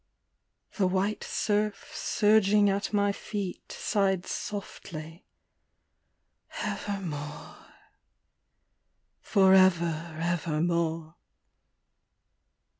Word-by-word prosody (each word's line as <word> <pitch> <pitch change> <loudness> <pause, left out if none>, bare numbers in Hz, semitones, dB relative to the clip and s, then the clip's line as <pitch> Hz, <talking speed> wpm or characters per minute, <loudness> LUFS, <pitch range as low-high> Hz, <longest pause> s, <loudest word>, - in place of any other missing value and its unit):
The 195 -3 +3
white 195 +3 0
surf, 210 -1 -1
surging 210 -1 +3
at 200 +1 -2
my 205 -1 +2
feet, 200 -2 -5
sighed 190 -3 0
softly, 165 -5 -6 0.6
'' - - -13
Ever 200 -1 -3
more," 150 -3 -7 1.5
forever 175 -5 +3
evermore. 165 -1 -1
190 Hz, 65 wpm, -28 LUFS, 165-205 Hz, 1.5 s, The